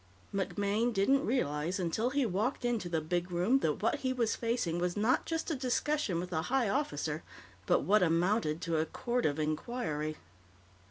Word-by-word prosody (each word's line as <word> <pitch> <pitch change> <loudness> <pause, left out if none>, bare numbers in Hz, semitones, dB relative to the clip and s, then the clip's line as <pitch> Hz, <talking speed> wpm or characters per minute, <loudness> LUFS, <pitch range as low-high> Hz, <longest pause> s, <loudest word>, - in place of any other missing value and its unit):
MacMaine 205 +4 0
didn't 240 +7 +2
realize 175 - 0
until 185 +7 0
he 280 0 +1
walked 220 +5 -1
into 230 -7 0
the 165 -2 0
big 175 +3 -1
room 180 +10 +2
that 160 - -1
what 235 +6 +1
he 260 -2 0
was 235 -3 +1
facing 230 -8 -1
was 180 +2 -1
not 220 +5 +2
just 325 0 -2
a - - 0
discussion 260 - 0
with 180 +1 -5
a 160 - +1
high 260 -3 +2
officer, 290 +6 -1 0.5
but - - +4
what 210 +2 +4
amounted 170 -1 +2
to 165 -2 0
a 155 - +2
Court 245 +6 -1
of 145 0 -1
Inquiry. 155 -1 -2
205 Hz, 175 wpm, -32 LUFS, 170-250 Hz, 0.5 s, but